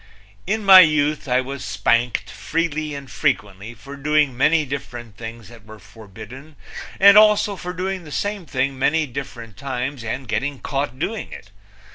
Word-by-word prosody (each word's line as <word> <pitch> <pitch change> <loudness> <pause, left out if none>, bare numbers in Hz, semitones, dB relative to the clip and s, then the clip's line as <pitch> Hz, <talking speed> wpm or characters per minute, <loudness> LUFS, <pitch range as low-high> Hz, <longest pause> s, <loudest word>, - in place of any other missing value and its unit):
In 215 +1 -1
my 190 -1 +10
youth 150 -3 +3
I 125 0 +2
was 135 +1 -7
spanked 115 -2 0
freely 155 +5 -3
and 140 -1 -8
frequently 105 -2 -2
for 135 +5 -11
doing 150 -1 +1
many 155 +4 +2
different 120 -5 -7
things 115 -1 -9
that 115 -2 -15
were 110 0 -13
forbidden, 110 +8 -13 0.4
and 200 +2 +8
also 210 -1 +4
for 180 -1 -6
doing 185 +1 -4
the 150 - -12
same 200 +1 -3
thing 130 +1 -2
many 155 +3 +2
different 120 -6 -8
times 130 -1 -4
and 125 +3 -5
getting 140 +6 -2
caught 135 -2 -3
doing 205 +9 -4
it. 100 - -11
140 Hz, 160 wpm, -21 LUFS, 120-155 Hz, 0.4 s, my